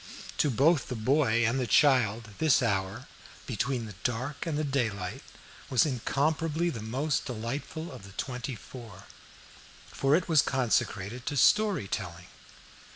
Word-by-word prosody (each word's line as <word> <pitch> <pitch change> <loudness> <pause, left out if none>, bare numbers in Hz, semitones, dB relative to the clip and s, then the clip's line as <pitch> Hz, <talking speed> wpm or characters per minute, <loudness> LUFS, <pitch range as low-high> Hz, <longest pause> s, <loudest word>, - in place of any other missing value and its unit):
To 150 - +3
both 140 +4 +3
the 125 - -4
mother 130 +4 +2
and 115 +3 +2
the 125 - -1
child, 115 -4 +3
this 145 -6 +4
hour, 95 -4 -1 0.4
"between 125 +1 -2
the 105 - -8
dark 130 +6 -2
and 155 -3 -1
the 155 - 0
daylight" 115 -5 -2 0.5
was 130 -1 +4
incomparably 155 +5 0
the 115 - -6
most 135 +7 -1
delightful 135 +8 -5
of - - -10
the 95 0 -13
twenty 125 +2 -4
four, 110 -3 -11 0.8
for 135 +2 +1
it 170 +1 0
was 160 -4 +5
consecrated 120 -3 -1
to 145 - -1
story 210 - +4
telling. 85 -1 -5
130 Hz, 145 wpm, -29 LUFS, 110-145 Hz, 0.8 s, was